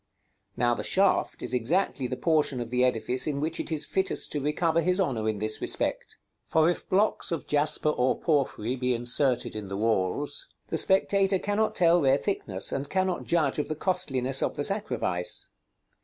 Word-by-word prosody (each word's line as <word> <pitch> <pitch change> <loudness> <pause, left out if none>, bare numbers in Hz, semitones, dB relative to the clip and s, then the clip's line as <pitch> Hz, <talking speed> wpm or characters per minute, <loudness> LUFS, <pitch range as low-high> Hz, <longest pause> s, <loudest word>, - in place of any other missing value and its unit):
Now 120 0 +2
the - - -3
shaft 195 0 +1
is 125 - 0
exactly 130 +2 0
the - - -4
portion 155 -5 +1
of 120 -1 -5
the 125 0 +2
edifice 125 +2 0
in 145 -2 -1
which 160 +3 -2
it - - -4
is 155 -2 +1
fittest 190 0 -1
to 145 - -2
recover 160 +3 +1
his 180 +3 0
honor 120 - 0
in 110 - -2
this 110 +1 -3
respect. - - -3 0.3
For 160 +1 +3
if - - -7
blocks 200 0 +2
of 165 -5 -3
jasper 150 +1 +2
or 130 -3 0
porphyry 135 -6 0
be 125 -1 0
inserted 120 0 +1
in 105 -2 -6
the 95 0 -5
walls, 110 +6 -1 0.2
the 160 - -1
spectator 195 +2 +3
cannot 205 +3 -1
tell 175 -1 +4
their 135 -1 +4
thickness, 105 - -2
and 140 +1 -3
cannot 185 -1 -1
judge 155 -5 +1
of 150 - -1
the 155 - -3
costliness 135 -7 -1
of - - -1
the 145 - -2
sacrifice. 195 - -1
145 Hz, 185 wpm, -27 LUFS, 125-175 Hz, 0.3 s, tell